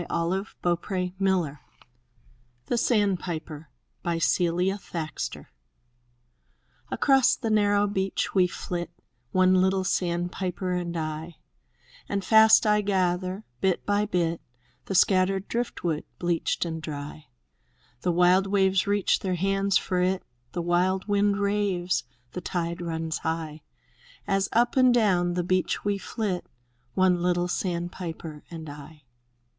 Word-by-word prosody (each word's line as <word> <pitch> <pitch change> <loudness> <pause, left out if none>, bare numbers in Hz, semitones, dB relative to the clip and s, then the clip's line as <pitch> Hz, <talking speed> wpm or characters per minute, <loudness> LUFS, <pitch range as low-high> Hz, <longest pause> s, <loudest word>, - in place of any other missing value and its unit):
114. 185 +5 -1
THE 175 -1 +3
TREASURE 180 +1 -4
CHEST 180 -7 +1 1.1
THE 240 - -1
SANDPIPER 175 - -1 0.5
Celia 180 +4 +1
Thaxter 160 -4 -5 1.4
Across 270 -1 +4
the 225 -4 -3
narrow 205 -1 +3
beach 195 -1 -1
we 185 -2 +4
flit, 175 0 -4 0.4
One 185 +1 +4
little 190 +1 +3
sandpiper 180 +1 -2
and 175 -1 -2
I; 155 +1 -4 0.7
And 200 -2 -2
fast 220 +1 +7
I 210 0 +4
gather, 185 0 0 0.2
bit 190 -2 0
by 205 +1 +1
bit, 170 -4 0 0.4
The 195 - -3
scattered 190 +1 +3
driftwood, 175 -9 -2
bleached 175 0 0
and 160 -1 -4
dry. 145 -1 -7 0.7
The 180 - +1
wild 180 +3 +4
waves 190 -1 +2
reach 205 -1 +2
their 185 -2 -1
hands 195 +2 +2
for 185 -2 -1
it. 185 +1 0 0.3
The 175 - -2
wild 180 +3 +1
wind 205 0 +2
raves, 200 -6 0 0.3
the 180 - -5
tide 170 0 -3
runs 160 -1 -3
high. 160 -1 -3 0.6
As 195 0 +1
up 240 +1 +2
and 255 -1 +6
down 185 -7 +2
the 180 - 0
beach 185 +2 0
we 200 -1 0
flit, 195 -2 -3 0.3
— 120 0 -42
One 185 -2 +3
little 175 0 +1
sandpiper 170 -3 -4
and 160 -2 -8
I. 145 +1 -11
185 Hz, 125 wpm, -26 LUFS, 170-195 Hz, 1.4 s, fast